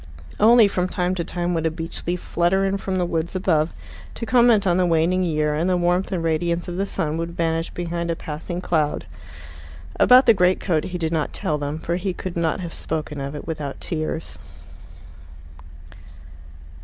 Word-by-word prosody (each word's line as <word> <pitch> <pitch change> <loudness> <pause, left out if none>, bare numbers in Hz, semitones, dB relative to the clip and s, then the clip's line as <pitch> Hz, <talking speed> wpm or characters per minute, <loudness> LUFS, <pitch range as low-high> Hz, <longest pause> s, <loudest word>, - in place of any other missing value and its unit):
Only 225 +1 +7
from 185 -2 -1
time 180 -1 -1
to 175 -2 -2
time 175 +1 -2
would 165 -1 0
a - - +2
beech 165 +1 -6
leaf 180 +1 0
flutter 175 +4 +1
in 195 0 0
from 190 -1 -2
the 180 - +1
woods 165 +1 -2
above, 165 -4 +1 0.4
to 230 - -4
comment 235 -3 +4
on 175 -2 +3
the 185 - +3
waning 170 +2 +2
year, 155 -4 0
and 165 +5 0
the 180 - +2
warmth 175 +2 +1
and 175 -3 -1
radiance 170 +1 0
of 175 0 -5
the 195 +1 -1
sun 155 -3 -2
would 165 +1 -4
vanish 165 0 0
behind 170 -1 -4
a 165 - 0
passing 165 +3 -6
cloud. 155 -5 0 0.9
About 255 +1 +7
the 230 - +7
greatcoat 180 -4 +1
he 180 - -4
did 165 -2 -2
not 155 -2 -1
tell 150 -1 -1
them, 145 +1 -3
for 170 +2 -2
he 185 0 -3
could 185 -2 -6
not 170 +2 0
have 170 -2 -6
spoken 150 -2 -4
of 140 +2 -5
it 145 - -7
without 150 -4 -5
tears. 160 0 -3
170 Hz, 190 wpm, -22 LUFS, 160-185 Hz, 0.9 s, Only